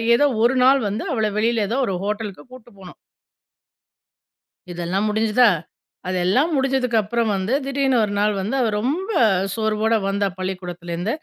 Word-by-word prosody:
ஏதோ 290 - +3 0.2
ஒரு 240 +3 +3
நாள் 270 +1 +5
வந்து 205 +2 -3
அவள 220 -4 0
வெளில 225 -1 +1
ஏதோ 240 - -1
ஒரு 195 - -2
ஹோட்டலுக்கு 210 -1 -4
கூட்டு 255 -2 -13
போனோம். 185 -2 -12 1.8
இதெல்லாம் 175 +4 -2
முடிஞ்சுதா, 220 +3 +3 0.6
அதெல்லாம் 185 - +1
முடிஞ்சதுக்கு 265 -3 +1
அப்புறம் 225 +1 -1
வந்து, 195 +5 -2
திடீர்னு 275 -2 +1
ஒரு 205 -1 -2
நாள் 210 +1 +2
வந்து, 215 +8 -2
அவ 230 - +1
ரொம்ப 310 - -2 0.5
சோர்வோடு 220 0 +1
வந்தா 200 0 0
பள்ளிக்கூடத்திலருந்து. 180 0 -4
220 Hz, 140 wpm, -21 LUFS, 195-250 Hz, 1.8 s, நாள்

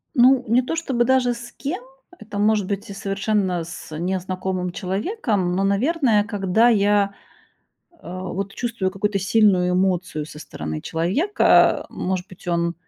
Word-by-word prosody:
Ну, 255 +1 +5
не 235 +4 +4
то 255 +6 -3
чтобы 260 -8 0
даже 255 -1 +3
с 235 0 -9
кем-то- 360 - -4 0.4
это 210 -1 -8
может 210 -2 +2
быть 200 0 -4
и - - -6
совершенно 195 -2 -1
с 160 -1 -8
незнакомым 185 +1 -2
человеком. 195 - -1
Но, 195 - +1
наверное, 225 +2 +2
когда 210 +2 +2
я, 205 -2 +3 0.8
э, 340 - -28
вот 185 +2 -5
чувствую 230 -6 -2
какую-то 200 +1 -1
сильную 195 -3 +3
эмоцию 180 -4 0
со 150 - -11
стороны 75 - -6
человека, 195 - +3
э, - - -19
может 185 +1 -3
быть, 185 -1 -15
он 170 0 0
200 Hz, 150 wpm, -22 LUFS, 185-235 Hz, 0.8 s, Ну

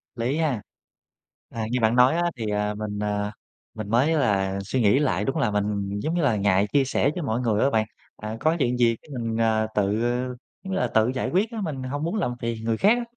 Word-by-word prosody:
Lý 125 +5 -1
ha. 145 -10 0 0.9
À, 115 -1 -4
như 125 - +1
bạn 110 +1 +3
nói 125 +4 +5
á 175 - +1
thì, 115 - -3
à, 105 0 0
mình, 105 -1 -5
à, 105 0 -1 0.4
mình 110 -2 -6
mới 125 +8 +3
là 100 -9 +1
suy 120 +6 -1
nghĩ 110 +6 +4
lại, 130 -9 +1
đúng 135 +4 -1
là 125 -8 +1
mình, 100 -1 -1
giống 155 +10 -2
như 175 - +1
là, 135 -8 +2
ngại 100 0 +2
chia 140 - +4
sẻ 135 - +1
với 175 - -3
mọi 115 -3 -1
người 110 -3 +1
á 135 - +4
bạn. 110 -4 +1 0.3
Ờ, 110 +1 -6
có 160 +5 +2
chuyện 125 -3 +1
gì 120 -1 +3
cái - - -21
mình, 115 -1 -2
ờ, 110 -1 +2
tự, 100 -1 +2 0.7
giống 190 -1 -4
như - - 0
là, - - +1
tự 110 0 +2
giải 130 - -2
quyết 200 +6 +1
á, 225 -2 -4
mình 145 -8 -4
hông 145 +4 -3
muốn 170 +6 -1
làm 165 - 0
phiền 115 -1 -3
người 115 0 0
khác 215 - +4
á 240 - -2
115 Hz, 245 wpm, -25 LUFS, 105-140 Hz, 0.9 s, nói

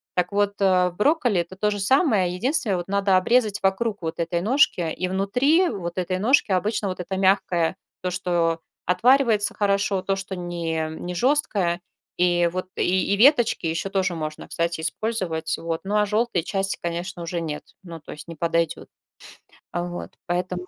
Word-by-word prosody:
Так 180 +2 0
вот, 200 0 +1
э, 185 -2 +4
в 175 - -15
брокколи 245 - +2
это 170 +2 -9
то 210 +2 0
же 205 - -3
самое, 200 - +3
единственное, 245 - +1
вот 175 - -5
надо 200 -1 +2
обрезать 210 +1 +2
вокруг 200 +2 0
вот 160 -1 -4
этой 170 +1 -1
ножки 200 - +2
и 185 - -2
внутри 250 - +2
вот 175 - -5
этой 185 0 -1
ножки 225 +3 +3
обычно 200 +2 0
вот 185 - -5
это 185 +2 -4
мягкое, 185 -3 +2 0.2
то, 180 - -2
что 175 -2 0 0.3
отваривается 225 +3 +3
хорошо, 200 -1 +1
то, 195 +1 -1
что 190 0 -5
не, 170 -3 -3
не 175 +3 -6
жёсткое 200 - +1 0.4
и 175 -1 +3
вот 185 +1 -3
и 185 +2 +1
веточки 240 - +4
ещё 165 +4 -2
тоже 185 -3 0
можно, 155 -1 -5
кстати, 170 -1 -2
использовать. 175 -4 -2
Вот, 165 -1 -3
ну, 205 +2 0
а 210 - +3
жёлтые 215 -3 +1
части, 195 +2 -2
конечно, 175 +1 -4
уже 170 0 -3
нет, 150 -2 -4 0.2
ну, 170 -3 -9
то - - -11
есть 150 - -10
не 165 - -8
подойдет. 165 0 -1 0.8
Вот, 175 0 -4 0.2
поэтому, 180 +1 -2
185 Hz, 170 wpm, -24 LUFS, 170-205 Hz, 0.8 s, э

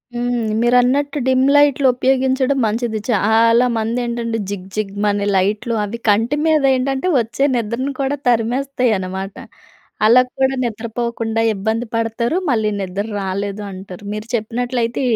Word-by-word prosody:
హ్మ్. 240 -1 -1 0.2
మీరన్నట్టు 250 +4 +2
డిమ్ 260 0 +3
లైట్లు 285 -2 +4
ఉపయోగించడం 265 +1 +1
మంచిది. 220 0 -1
చాలా 230 +3 +4
మంది 225 +2 -1
ఏంటంటే, 235 -1 -2
జిగ్ 190 -2 -6
జిగ్‌మనే 205 0 -1
లైట్లు 210 +5 0
అవి 230 +3 -5
కంటి 225 +7 +2
మీదేంటంటే, 275 0 +2
ఒచ్చే 245 +5 -1
నిద్రను 235 +4 -2
కూడా 275 +1 -1
తరిమేస్తయి 245 +1 +1
అనమాట. 190 +1 -5 0.7
అలాక్కూడ 255 +2 +3 0.2
నిద్రపోకుండా 230 0 -3
ఇబ్బంది 220 +4 -2
పడతారు, 230 +7 -1
మళ్ళీ 220 -3 +1
నిద్దర్రాలేదు 200 +1 -3
అంటారు. 190 +1 -10
మీరు 215 +2 -6
చెప్పినట్లయితే 235 +2 -2
230 Hz, 115 wpm, -18 LUFS, 210-255 Hz, 0.7 s, లైట్లు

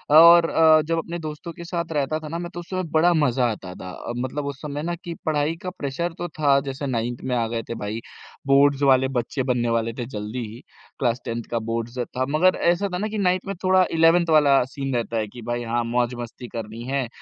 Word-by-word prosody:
और 170 +1 +9
अ, 160 -1 +6
जब 165 +1 0
अपने 170 +1 -4
दोस्तों 155 +1 -6
के 170 - -9
साथ 170 -1 -3
रहता 150 +1 0
था 155 - -8
ना 165 +3 -4
मैं 175 - -5
तो 175 - -6
उस 175 - -10
समय 185 -1 -2
बड़ा 170 +2 +4
मज़ा 135 -6 +2
आता 90 -4 -7
था। 95 +6 -7
मतलब 130 +4 -3
उस 140 -1 -5
समय 150 -1 -4
ना 175 +1 -2
कि 170 0 -7
पढ़ाई 155 +1 +1
का 185 - -4
प्रेशर 170 +1 -3
तो 175 - -3
था 140 -2 +4
जैसे 135 +1 -4
9th 120 -1 -2
में 125 -1 0
आ 115 -1 +1
गए 115 0 -3
थे - - -2
भाई 105 +1 -4 0.5
बोर्ड्स 140 0 +4
वाले 130 -1 +5
बच्चे 130 +1 -2
बनने 120 -2 0
वाले 115 0 0
थे, 120 0 -5
जल्दी 110 0 -5
ही 115 - -10 0.4
क्लास 120 -1 0
10th 115 0 -4
का 115 - 0
बोर्ड्स 115 +2 -3
था। 125 +1 -2
मगर 180 +5 +4 0.2
ऐसा 175 +4 0
था - - 0
ना 210 - -1
कि 215 0 -4
9th 185 -2 +1
में 195 - -3
थोड़ा 185 0 +5
11th 165 +1 +4
वाला 145 -4 +5
सीन 135 -2 -3
रहता 115 -1 -1
है 110 -1 -1
कि 120 +4 -11
भाई 120 0 -2
हाँ, 120 +1 -1
मौज-मस्ती 120 0 -2
करनी 115 0 -7
है। 135 -2 -1
140 Hz, 235 wpm, -23 LUFS, 120-165 Hz, 0.5 s, और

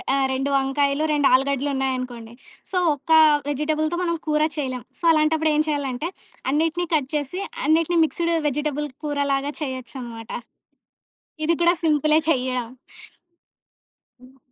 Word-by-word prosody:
ఆహ్, 380 - -12
ఆ - - +2
2 270 +2 -1
వంకాయలు, 280 +2 +1
2 290 -2 +2
ఆలుగడ్డలు 275 +2 +2
ఉన్నాయనుకోండి. 255 -3 -3 0.4
సో, 370 - +2 0.2
ఒక్క 290 +3 -3 0.4
వెజిటబుల్‌తో 310 +3 -1
మనం 335 -1 0
కూర 305 0 +2
చేయలేం. 255 -4 -3 0.2
సో, - - -12
అలాంటప్పుడు 315 0 +2
ఏం 305 - +3
చేయాలంటే, 285 0 -2 0.4
అన్నిటిని 325 +4 0
కట్ 285 -4 +1
చేసి 295 +6 -2 0.2
అన్నిటిని 330 +2 +2
మిక్స్‌డ్ 335 +2 -1 0.2
వెజిటబుల్ 295 +1 -2 0.2
కూర 290 -1 -2
లాగా 275 +2 -1
చేయొచ్చన‌మాట. 250 -4 -6 1.1
ఇది 330 +1 +2
కూడా 345 +1 +5
సింపులే 305 0 +3
చెయ్యడం. 255 -3 0 1.6
హ్మ్. 260 +1 -18
290 Hz, 130 wpm, -23 LUFS, 265-310 Hz, 1.6 s, కూడా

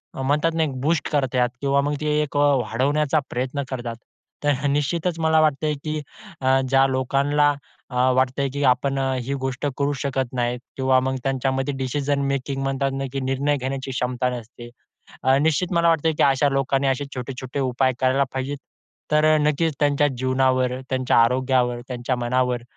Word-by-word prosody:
म्हणतात 145 +5 +1
ना 160 - +2
एक 135 -4 -3
बूस्ट 155 +2 0
करतात 130 -4 +1
किंवा 140 0 +2
मग 145 +1 -1
ते 150 0 +1
एक 145 -1 -3
अ, - - +3 0.2
वाढवण्याचा 140 +6 +1
प्रयत्न 130 +3 -2
करतात. 120 -3 -4 0.5
तर 145 - +3 0.2
निश्चितच 165 +4 -1
मला 160 0 +3
वाटतंय, 150 0 +1
की 155 -1 -3 0.4
अ, 130 0 +3
ज्या 135 0 +5
लोकांना 140 +3 +2 0.4
अ, 125 +1 +2
वाटतंय 130 +1 +1
की 145 0 -2
आपण 135 +2 +1
अ, 135 0 0
ही 135 +3 -3
गोष्ट 130 +1 -3
करू 145 0 0
शकत 130 -2 -2
नाही 120 0 -1 0.2
किंवा 130 -1 +3
मग 130 +1 -1
त्यांच्यामध्ये 135 +1 -1
डिसिजन 140 +2 -1
मेकिंग 135 0 -2
म्हणतात 135 0 -1
ना 135 0 -3
की 135 - -1
निर्णय 135 +2 0
घेण्याची 135 +1 -4
क्षमता 125 0 -1
नसते, 120 0 -8 0.5
अ, 130 +1 +4
निश्चित 160 +4 +1
मला 170 0 +3
वाटतं 160 0 +2
की - - +3
अशा 140 +1 +3
लोकांनी 135 0 0
असे 135 +2 0
छोटे-छोटे 130 +2 -5
उपाय 130 0 +1
करायला 130 +1 +3
पाहिजे. 135 +2 -3 0.6
तर 150 0 +4
अ, - - +4
नक्कीच 155 0 0
त्यांच्या 145 0 +3
जीवनावर, 130 0 +1
त्यांच्या 130 -1 +1
आरोग्यावर, 125 -1 +1
त्यांच्या 125 0 -2
मनावर 125 0 0
135 Hz, 170 wpm, -23 LUFS, 130-145 Hz, 0.6 s, ज्या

